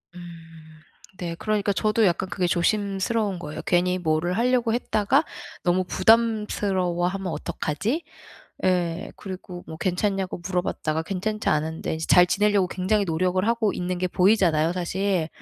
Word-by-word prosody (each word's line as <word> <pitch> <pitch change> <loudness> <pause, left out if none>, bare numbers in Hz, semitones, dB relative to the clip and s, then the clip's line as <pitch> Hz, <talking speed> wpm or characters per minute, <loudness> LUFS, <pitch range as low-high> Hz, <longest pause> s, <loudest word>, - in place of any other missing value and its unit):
음 165 -3 -13 0.4
네. 170 -2 -4
그러니까 210 +2 0
저도 215 +2 +2
약간 185 +1 0
그게 180 0 -1
조심스러운 200 +3 0
거예요. 155 -1 -6
괜히 180 +1 +2
뭐를 170 +2 0
하려고 240 -1 +2
했다가 240 +3 +2 0.4
너무 180 +1 +2
부담스러워하면 195 -3 +1
어떡하지? 210 - -2 0.6
예. 175 -2 0
그리고 185 -2 -8
뭐 160 - -7
괜찮냐고 190 +1 -1
물어봤다가 175 -4 -1
괜찮지 210 +5 -2
않은데 160 +2 -1
인제 160 - -4
잘 180 - +7
지내려고 200 +1 +2
굉장히 195 +4 0
노력을 185 +3 0
하고 230 -3 +1
있는 180 0 -3
게 185 +1 0
보이잖아요 180 -4 +3
사실. 185 -1 -1
185 Hz, 345 characters per minute, -24 LUFS, 175-205 Hz, 0.6 s, 잘